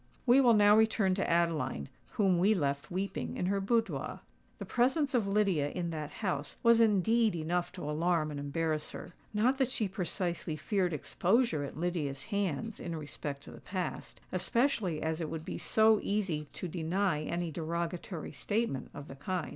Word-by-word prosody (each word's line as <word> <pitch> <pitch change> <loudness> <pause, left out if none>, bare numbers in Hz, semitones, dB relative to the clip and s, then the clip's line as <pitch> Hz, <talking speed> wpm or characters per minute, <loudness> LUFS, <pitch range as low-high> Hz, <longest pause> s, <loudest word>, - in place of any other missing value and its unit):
We 255 +2 +6
will 240 -3 +6
now 205 0 +6
return 220 -3 +3
to 190 +1 -1
Adeline, 165 - +1 0.3
whom 190 -4 +3
we 205 +4 +4
left 140 -5 -1
weeping 190 +2 -3
in - - -1
her 195 +1 +1
boudoir. 200 - -1 0.4
The - - -6
presence 270 +4 +1
of 230 -5 +2
Lydia 195 -8 +2
in 170 +1 -3
that 155 -2 -4
house 160 -9 -3
was 235 -1 +6
indeed 220 0 +3
enough 170 +2 -1
to 180 -6 -6
alarm 155 0 +1
and 145 - -5
embarrass 155 +2 -2
her. - - -8 0.2
Not 245 +6 +2
that 265 -2 +2
she 225 -5 0
precisely 175 -3 -2
feared 185 +3 0
exposure 180 - +1
at 140 - -7
Lydia's 155 -5 -2
hands 200 +2 -1
in 170 -1 -4
respect 145 -2 -6
to - - -10
the - - -12
past—especially 185 - -1
as 160 +1 -1
it 160 - -3
would 160 0 -5
be 185 - -5
so 220 -1 +4
easy 185 -8 -1
to 180 - -5
deny 170 0 0
any 170 +2 -2
derogatory 170 +1 -4
statement 205 - -1
of 145 - -8
the 135 - -9
kind. 175 +4 -3
180 Hz, 170 wpm, -32 LUFS, 155-210 Hz, 0.4 s, We